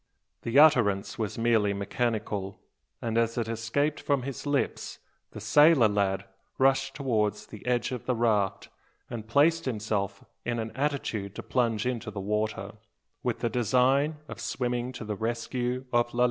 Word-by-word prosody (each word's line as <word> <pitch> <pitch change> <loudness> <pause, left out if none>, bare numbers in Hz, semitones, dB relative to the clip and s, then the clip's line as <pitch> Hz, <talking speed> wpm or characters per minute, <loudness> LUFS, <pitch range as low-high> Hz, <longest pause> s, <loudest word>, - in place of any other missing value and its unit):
The 115 +3 0
utterance 115 -12 +4
was 110 -3 -2
merely 115 -3 +2
mechanical; 100 -1 -2 0.4
and 115 0 +1
as 115 0 0
it 115 -2 0
escaped 115 +7 -1
from 140 -3 0
his 140 +2 -5
lips, 145 -1 -1 0.3
the - - -9
sailor 145 +3 +6
lad 100 -2 0 0.3
rushed 135 0 +2
towards 105 -6 0
the 105 - -11
edge 125 +1 +1
of 125 -3 -5
the 125 - +2
raft, 110 -4 +1 0.4
and 110 -3 -6
placed 160 +7 +3
himself 105 -4 -2 0.2
in 120 0 -2
an 110 -1 -3
attitude 130 -8 -2
to - - -6
plunge 115 -4 0
into 125 -2 -2
the 100 - -6
water, 105 0 -2 0.5
with - - -2
the 120 - +1
design 130 +6 +2
of - - -8
swimming 125 0 -2
to 125 -2 -7
the 105 -1 -3
rescue 120 +3 -2
of 120 0 +3
Lalee. - - -2
115 Hz, 160 wpm, -28 LUFS, 105-130 Hz, 0.5 s, sailor